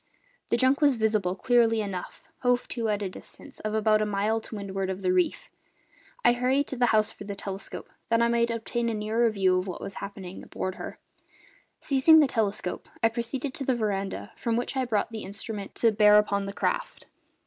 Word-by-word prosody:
The - - +2
junk 260 +4 +3
was 285 -3 +5
visible, 215 -5 +1
clearly 230 0 +3
enough, 195 -4 -5 0.2
hove 245 -1 +1
to 230 -2 -2
at 205 -1 0
a - - -1
distance 185 - -12
of 215 0 -3
about 215 0 +3
a - - +2
mile 210 +2 0
to 220 - -9
windward 195 -2 -3
of 190 +1 -4
the 185 0 +2
reef; 180 -1 0 0.8
and 240 - +6
I - - -8
hurried 265 +3 +2
to - - -3
the 245 -1 +2
house 215 -2 +3
for - - -11
the 200 0 -6
telescope, 195 0 -7 0.2
that 230 0 +2
I 235 - +4
might 235 0 +2
obtain 235 +1 -1
a 225 - -2
nearer 220 +3 +1
view 190 -3 +2
of 185 - -4
what 180 - -5
was 195 - -6
happening 190 -2 -7
aboard 185 - -4
her. - - -8 0.8
Seizing 295 +3 +5
the 300 - +6
telescope 210 -6 -2
I 225 - +6
proceeded 240 +4 -3
to 275 - -5
the 260 -1 +1
veranda, 200 -4 -2
from 230 -2 -1
which 245 - -2
I 260 -1 +1
brought 225 -2 0
the 220 -1 -5
instrument 200 +1 -6
to 230 - +3
bear 210 0 +6
upon 200 -1 +2
the 200 - -5
craft. - - -2
220 Hz, 210 wpm, -27 LUFS, 200-235 Hz, 0.8 s, and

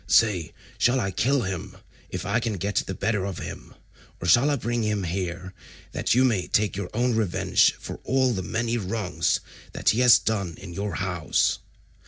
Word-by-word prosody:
Say, 105 -9 +3 0.3
shall 125 +2 +3
I 95 -4 -1
kill 130 +7 +1
him, 95 -3 -5 0.3
if - - -5
I 115 - +1
can 115 -2 -2
get 100 +2 -3
the 95 - -4
better 105 0 0
of 95 -2 -4
him, - - -8 0.4
or 85 - -4
shall 120 - +5
I 145 - +2
bring 120 -3 -2
him 105 -2 0
here 90 +1 -4 0.4
that - - 0
you 130 +1 +5
may 105 -8 +1
take 105 -1 +1
your 95 -2 -4
own 120 +1 +1
revenge 110 -6 +2
for - - -8
all 130 -1 +2
the 95 - -2
many 115 +5 -1
wrongs 100 -1 -1 0.3
that - - +1
he 110 - +2
has 125 -2 +8
done 100 -7 -2
in 90 -3 -9
your 100 -1 -3
house?" 90 -3 0
105 Hz, 190 wpm, -25 LUFS, 95-120 Hz, 0.4 s, has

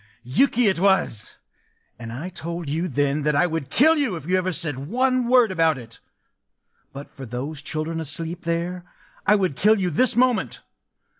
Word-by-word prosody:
Yuki 235 - +2
it 190 -4 +1
was! 190 - +1 0.6
And 115 -1 -7
I 145 +10 -6
told 170 -2 -6
you 160 +5 -1
then 145 0 0
that 150 0 +1
I 175 - +4
would 165 -5 -3
kill 315 +5 +4
you 265 -10 0
if 160 -4 -8
you 180 +3 +1
ever 185 0 0
said 160 -6 -3
one 255 - +1
word 245 -4 +4
about 165 -4 +2
it!... 115 -2 -12 0.9
But 140 +1 -10
for 135 -2 -8
those 135 +6 -5
children 160 +2 -4
asleep 165 +3 -5
there, 170 +2 -2 0.4
I 210 - +6
would 185 -8 0
kill 215 +5 +3
you 180 -2 0
this 250 +11 +2
moment! 250 -1 +1
170 Hz, 175 wpm, -23 LUFS, 145-200 Hz, 0.9 s, I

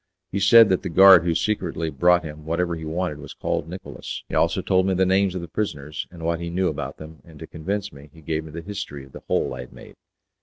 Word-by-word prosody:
He 100 - -1
said 110 +2 +7
that 95 - +2
the - - -4
guard 95 0 +8
who 85 -1 +1
secretly 85 -6 -1
brought 90 +5 +3
him 75 -1 -8
whatever 85 +2 -1
he 80 -1 -7
wanted 80 -1 -3
was 75 -1 -10
called 80 - -3
Nicolas, 90 +2 -7
he - - -12
also - - +1
told 95 0 +2
me 95 - +1
the 95 +1 +3
names 95 0 +2
of 90 - -3
the 85 - -7
prisoners, 75 -6 -4
and 85 -2 -11
what 85 0 -1
he 85 0 -4
knew 90 +2 0
about - - -5
them, 80 -2 -12
and 80 -2 -15
to 80 - -8
convince 100 +6 -4
me 70 +1 -14
he 80 - -17
gave 80 +1 -2
me - - -10
the 85 - -6
history 80 -7 -7
of 65 - -19
the - - -11
hole - - 0
I - - -8
had 60 - -9
made. - - -13
85 Hz, 260 wpm, -23 LUFS, 80-95 Hz, -, guard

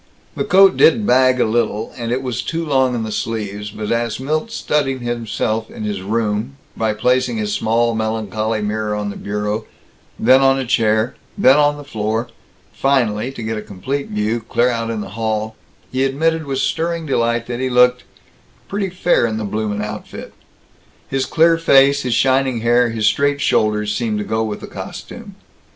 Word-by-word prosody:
The - - -1
coat 195 -1 +5
did 210 +6 +5
bag 130 -2 +4
a - - +3
little, 110 -1 -1
and 115 -1 -4
it 130 +2 -1
was 125 -3 -2
too 165 0 -3
long 130 -4 +2
in 115 - -2
the 110 - -4
sleeves, 105 -2 -4
but 105 0 -5
as 115 0 -1
Milt 155 - -2
studied 140 - -1
himself 115 -2 -2
in - - -8
his 105 -3 -3
room 110 +4 -2 0.2
by 110 -1 -1
placing 125 +1 +1
his 105 -1 -2
small 115 +2 +1
melancholy 110 0 -2
mirror 105 0 -2
on 105 -1 -3
the - - -9
bureau, 105 +1 -3 0.5
then 130 +1 +5
on 135 0 +4
a 135 - -2
chair, 110 -1 +1 0.2
then 130 +2 +6
on 145 0 +3
the 145 - -9
floor, 110 -2 -2 0.4
finally, 125 -4 +1
to 120 - -8
get 110 0 -3
a - - -6
complete 130 +9 -4
view, 105 +2 -1
clear 120 +2 +1
out 115 -1 -2
in 110 -2 -3
the - - -7
hall 110 +1 -2 0.4
he 130 +1 0
admitted 160 +3 0
with 135 -1 -2
stirring 165 +5 -1
delight 115 -4 0
that 120 0 -5
he 130 0 -1
looked 125 0 +4 0.6
"pretty 200 -1 -2
fair 175 -8 +2
in 110 -1 -3
the 110 - -3
bloomin' 105 0 -2
outfit." 105 0 -7 0.8
His 135 -1 -1
clear 165 0 +3
face, 140 -3 +5
his 125 -3 -1
shining 130 -2 +2
hair, 120 +1 +3
his 110 -1 -2
straight 140 +6 +2
shoulders, 105 -4 +1
seemed 110 -2 -1
to 105 - -3
go 110 0 -1
with 105 -2 -4
the - - -6
costume. - - -9
115 Hz, 185 wpm, -19 LUFS, 110-135 Hz, 0.8 s, then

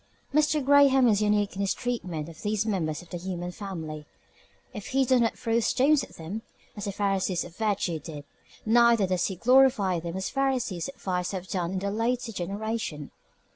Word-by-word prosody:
Mr. 300 -1 +2
Graham 275 -2 +6
is 210 -2 +3
unique 210 -1 +1
in 195 - -4
his 195 - 0
treatment 180 -11 -3
of 165 -1 -12
these 215 0 0
members 175 -7 -2
of 175 - -20
the 175 - -3
human 175 0 -5
family. 160 -7 -7 0.7
If 210 -3 -7
he 270 0 +2
does 255 -1 +3
not 230 - 0
throw 230 0 +1
stones 275 +5 +3
at - - -11
them, 175 +7 -6 0.3
as 205 0 -5
the 200 - -2
Pharisees 195 -3 0
of 175 - -12
virtue 200 -6 -1
did, 150 -1 -8 0.4
neither 235 -1 +5
does 185 -1 0
he 190 - -4
glorify 245 -4 +4
them 170 +2 -5
as 190 - -3
the - - -3
Pharisees 260 -10 0
of 275 - -9
vice 180 0 -2
have 190 -1 -5
done 180 -1 -2
in 190 +1 -3
a 200 - -1
later 230 +2 -1
generation. 200 -5 -4
200 Hz, 195 wpm, -27 LUFS, 180-235 Hz, 0.7 s, Graham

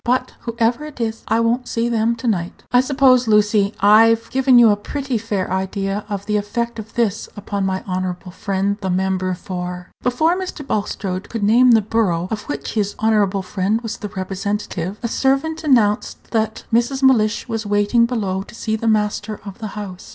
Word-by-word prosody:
"But, 255 +1 0
whoever 235 +3 -1
it 300 -4 -10
is, 225 -1 -3
I 225 +1 +2
won't 235 +2 0
see 230 0 -1
them 230 0 +1
to 235 +1 -5
night. 180 -6 -2
I 245 - +5
suppose, 260 -2 +3
Lucy, 210 -1 +3
I've 225 +3 +5
given 265 -1 +4
you 235 -3 +7
a - - +3
pretty 270 +5 -4
fair 205 -4 -3
idea 195 +2 -2
of 200 -1 -4
the 210 0 +1
effect 230 +3 -3
of 220 0 -10
this 220 -3 0
upon 200 -1 -2
my 190 0 -2
honorable 185 -1 -4
friend, 195 +2 -2
the 190 - -2
member 185 0 0
for 180 0 -6
" - - -51
Before 310 +8 +2
Mr. 365 -6 -5
Bulstrode 200 -4 -3
could 225 -3 -4
name 240 +5 +5
the 220 -2 +4
borough 195 -6 0
of 215 +2 -5
which - - -4
his 205 -2 -1
honorable 205 -3 +1
friend 195 +3 -1
was 225 -2 -5
the 210 - -6
representative, 195 -1 -4
a - - +1
servant 280 +7 0
announced 225 -8 +1
that 220 -1 -1
Mrs. 240 +4 +1
Mellish 230 -5 +3
was 225 -2 -3
waiting 205 +3 +3
below 200 -6 -2
to 200 - -12
see 220 -1 -2
the 225 +1 -3
master 210 -1 0
of 200 +1 -9
the 215 -2 -6
house. 190 -3 -7
215 Hz, 190 wpm, -20 LUFS, 195-235 Hz, -, you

